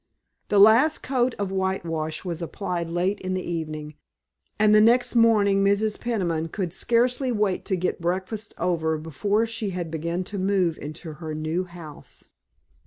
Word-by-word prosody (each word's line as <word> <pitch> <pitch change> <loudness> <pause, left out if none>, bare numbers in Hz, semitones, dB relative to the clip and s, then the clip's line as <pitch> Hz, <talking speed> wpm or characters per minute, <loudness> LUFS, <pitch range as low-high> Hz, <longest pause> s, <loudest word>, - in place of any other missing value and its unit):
The 205 - +1
last 225 +10 +6
coat 255 -2 0
of 200 -2 -3
whitewash 170 -4 -2
was 170 -2 -4
applied 175 0 -3
late 180 +4 0
in 185 0 -3
the 185 - -4
evening, 155 -3 -4 0.6
and 210 0 +4
the 215 - +7
next 240 +2 +4
morning 210 -4 +4
Mrs. 200 +2 +1
Peniman 175 -9 -1
could 175 0 -4
scarcely 245 +5 +1
wait 210 -5 0
to 190 - 0
get 180 -1 -2
breakfast 190 +5 -3
over 160 -3 0
before 200 +8 0
she 225 -2 -3
began 170 +2 -3
to 200 +2 -6
move 185 -4 +1
into 155 +2 -7
her 155 -1 -4
new 160 +4 -2
house. 170 -4 -11
185 Hz, 155 wpm, -25 LUFS, 165-210 Hz, 0.6 s, the